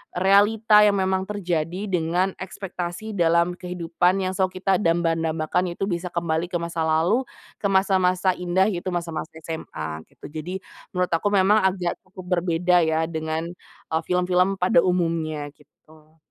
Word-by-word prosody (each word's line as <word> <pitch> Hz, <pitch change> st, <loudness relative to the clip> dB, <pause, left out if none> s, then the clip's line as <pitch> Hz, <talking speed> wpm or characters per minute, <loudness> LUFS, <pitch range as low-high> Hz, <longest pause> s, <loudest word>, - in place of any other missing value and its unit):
realita 210 Hz, +3 st, +5 dB
yang 205 Hz, -1 st, +4 dB
memang 190 Hz, 0 st, +1 dB
terjadi 180 Hz, -1 st, -2 dB
dengan 180 Hz, +2 st, +1 dB
ekspektasi 190 Hz, +1 st, -6 dB
dalam 170 Hz, 0 st, +2 dB
kehidupan 180 Hz, +1 st, 0 dB
yang 185 Hz, -, -1 dB
selalu 185 Hz, -1 st, -1 dB
kita 195 Hz, -1 st, +3 dB
damba-dambakan 165 Hz, +1 st, 0 dB
itu -, -, +1 dB
bisa 175 Hz, -1 st, -2 dB
kembali 170 Hz, 0 st, -1 dB
ke 175 Hz, -, 0 dB
masa 170 Hz, -1 st, -3 dB
lalu, 170 Hz, +11 st, +2 dB, 0.4 s
ke 200 Hz, -, 0 dB
masa-masa 185 Hz, -1 st, +3 dB
indah 180 Hz, +2 st, +1 dB
yaitu 185 Hz, -2 st, -2 dB
masa-masa 170 Hz, -2 st, -4 dB
SMA, 80 Hz, -, -6 dB
gitu. -, -, -15 dB
Jadi, 175 Hz, +5 st, -5 dB, 0.3 s
menurut 180 Hz, -1 st, -1 dB
aku 165 Hz, -, -1 dB
memang 200 Hz, +2 st, +4 dB
agak 185 Hz, -2 st, 0 dB
cukup 185 Hz, 0 st, -11 dB
berbeda 175 Hz, 0 st, +2 dB
ya 160 Hz, 0 st, +1 dB
dengan, 160 Hz, 0 st, -3 dB, 0.4 s
e -, -, 0 dB
film-film 180 Hz, +1 st, +2 dB
pada 225 Hz, +8 st, +4 dB
umumnya, 165 Hz, -4 st, -1 dB
gitu. 155 Hz, +2 st, -23 dB
180 Hz, 145 wpm, -24 LUFS, 165-190 Hz, 0.4 s, realita